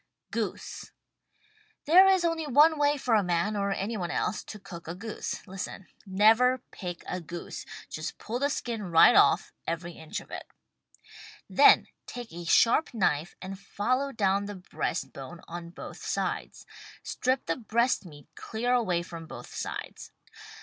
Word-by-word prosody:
GOOSE -, -, -4 dB, 0.9 s
There 365 Hz, +6 st, +8 dB
is 380 Hz, -2 st, +4 dB
only 330 Hz, -2 st, 0 dB
one 300 Hz, +3 st, +5 dB
way 290 Hz, 0 st, +3 dB
for 250 Hz, -3 st, 0 dB
a 215 Hz, -, +5 dB
man, 180 Hz, +3 st, 0 dB
or 200 Hz, -1 st, 0 dB
any 205 Hz, +3 st, -2 dB
one 175 Hz, -3 st, -3 dB
else, 180 Hz, +2 st, -1 dB
to 215 Hz, -, -8 dB
cook 180 Hz, -5 st, -10 dB
a 165 Hz, -, -4 dB
goose. 220 Hz, +4 st, -5 dB
Listen: 195 Hz, 0 st, -6 dB, 0.2 s
Never 225 Hz, +6 st, +4 dB
pick 175 Hz, -3 st, -6 dB
a 180 Hz, -, -3 dB
goose! 170 Hz, +1 st, -7 dB, 0.2 s
Just 155 Hz, +1 st, -5 dB
pull 235 Hz, +3 st, -4 dB
the 285 Hz, +1 st, +2 dB
skin 235 Hz, -5 st, -3 dB
right 170 Hz, -4 st, +6 dB
off -, -, +4 dB
— -, -, -42 dB
every 170 Hz, +1 st, -3 dB
inch 160 Hz, -2 st, -6 dB
of -, -, -15 dB
it. -, -, -6 dB, 1.0 s
Then -, -, +7 dB, 0.2 s
take 240 Hz, -5 st, -8 dB
a 175 Hz, 0 st, -7 dB
sharp 235 Hz, -, +4 dB
knife 175 Hz, -5 st, +1 dB
and 190 Hz, 0 st, -6 dB
follow 255 Hz, +8 st, -1 dB
down 200 Hz, -3 st, +1 dB
the 205 Hz, 0 st, -6 dB
breast 175 Hz, -6 st, -3 dB
bone 140 Hz, +5 st, -9 dB
on 170 Hz, 0 st, -7 dB
both 175 Hz, -, -9 dB
sides. -, -, -3 dB, 0.4 s
Strip 255 Hz, 0 st, -1 dB
the 165 Hz, -1 st, 0 dB
breast 235 Hz, +1 st, +1 dB
meat 150 Hz, -5 st, -13 dB
clear 240 Hz, +2 st, -2 dB
away 185 Hz, -9 st, +1 dB
from 165 Hz, -2 st, -9 dB
both -, -, -10 dB
sides. -, -, -6 dB
200 Hz, 165 wpm, -28 LUFS, 175-245 Hz, 1.0 s, There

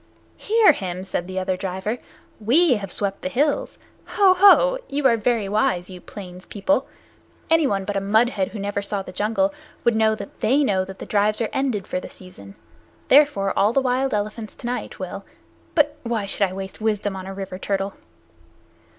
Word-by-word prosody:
"Hear 440 Hz, -3 st, +5 dB
him!" 185 Hz, -8 st, -5 dB
said 180 Hz, -2 st, -3 dB
the 185 Hz, 0 st, -6 dB
other 185 Hz, 0 st, 0 dB
driver. 190 Hz, +5 st, -3 dB, 0.4 s
"We 255 Hz, +5 st, +4 dB
have 195 Hz, -3 st, -7 dB
swept 200 Hz, -1 st, -2 dB
the -, -, -3 dB
hills! 290 Hz, +7 st, 0 dB, 0.4 s
Ho! 390 Hz, -3 st, +6 dB
Ho! 410 Hz, +7 st, +6 dB
You 280 Hz, 0 st, -2 dB
are 240 Hz, -3 st, +6 dB
very 225 Hz, -2 st, 0 dB
wise, 190 Hz, -3 st, 0 dB
you 180 Hz, -1 st, -10 dB
plains 185 Hz, -3 st, -10 dB
people. 260 Hz, +7 st, 0 dB, 0.6 s
Anyone 270 Hz, -13 st, +2 dB
but 205 Hz, 0 st, -3 dB
a 195 Hz, -, 0 dB
mud 220 Hz, +5 st, +3 dB
head 195 Hz, -6 st, -1 dB
who 215 Hz, -, -8 dB
never 200 Hz, 0 st, -2 dB
saw 200 Hz, -1 st, -2 dB
the 185 Hz, -, -9 dB
jungle 225 Hz, +10 st, 0 dB, 0.3 s
would 235 Hz, -1 st, +3 dB
know 220 Hz, 0 st, +3 dB
that 200 Hz, -2 st, -10 dB
they 275 Hz, +6 st, +3 dB
know 190 Hz, -7 st, +1 dB
that 190 Hz, 0 st, -10 dB
the -, -, -8 dB
drives 210 Hz, +1 st, +1 dB
are 230 Hz, -, -1 dB
ended 255 Hz, -8 st, -1 dB
for 180 Hz, -, -3 dB
the -, -, -9 dB
season. 100 Hz, -, -13 dB, 0.5 s
Therefore 265 Hz, -9 st, +4 dB
all 210 Hz, +3 st, +3 dB
the 275 Hz, -, +4 dB
wild 260 Hz, +1 st, 0 dB
elephants 215 Hz, +1 st, -3 dB
to -, -, -11 dB
night 245 Hz, +1 st, -4 dB
will -, -, -6 dB, 0.5 s
but 295 Hz, -2 st, +3 dB
why 230 Hz, -5 st, -2 dB
should 200 Hz, 0 st, 0 dB
I -, -, -8 dB
waste 190 Hz, +2 st, -7 dB
wisdom 210 Hz, -2 st, -1 dB
on 190 Hz, 0 st, -7 dB
a 195 Hz, -, -6 dB
river 190 Hz, -1 st, -6 dB
turtle?" 195 Hz, 0 st, -2 dB
210 Hz, 195 wpm, -22 LUFS, 195-255 Hz, 0.6 s, Ho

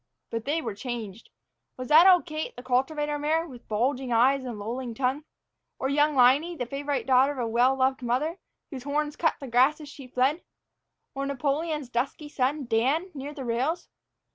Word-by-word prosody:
But 230 Hz, -1 st, -4 dB
they 310 Hz, +4 st, -1 dB
were 225 Hz, -, -3 dB
changed. 225 Hz, -2 st, -6 dB, 0.5 s
Was 255 Hz, 0 st, -6 dB
that 320 Hz, +5 st, +8 dB
old 360 Hz, -2 st, +6 dB
Kate, 310 Hz, -2 st, -5 dB
the 245 Hz, -, -10 dB
cultivator 295 Hz, +4 st, 0 dB
mare, 315 Hz, +3 st, +1 dB
with 245 Hz, -5 st, -13 dB
bulging 250 Hz, +4 st, -1 dB
eyes 260 Hz, +4 st, +3 dB
and 245 Hz, -4 st, -5 dB
lolling 235 Hz, +3 st, -5 dB
tongue? 270 Hz, +4 st, -1 dB, 0.5 s
Or 265 Hz, -, -2 dB
young 295 Hz, +1 st, +2 dB
Liney, 275 Hz, +7 st, +4 dB
the 245 Hz, -, -2 dB
favorite 280 Hz, +2 st, -3 dB
daughter 265 Hz, +2 st, +4 dB
of -, -, -11 dB
a 245 Hz, -, -1 dB
well 245 Hz, +4 st, +3 dB
loved 265 Hz, 0 st, +1 dB
mother, 275 Hz, +9 st, -1 dB, 0.3 s
whose 265 Hz, -3 st, -6 dB
horns 295 Hz, +2 st, -2 dB
cut 325 Hz, -, +1 dB
the 275 Hz, -, -7 dB
grass 255 Hz, +6 st, +3 dB
as 300 Hz, -2 st, -10 dB
she 275 Hz, -2 st, -11 dB
fled? 260 Hz, +6 st, +1 dB, 0.7 s
Or 275 Hz, 0 st, -3 dB
Napoleon's 290 Hz, +2 st, -2 dB
dusky 260 Hz, +5 st, -3 dB
son, 275 Hz, +1 st, -1 dB
Dan, 265 Hz, +11 st, +1 dB
near 290 Hz, +1 st, -7 dB
the 270 Hz, -3 st, -6 dB
rails? 255 Hz, +9 st, -1 dB
270 Hz, 185 wpm, -27 LUFS, 245-295 Hz, 0.7 s, that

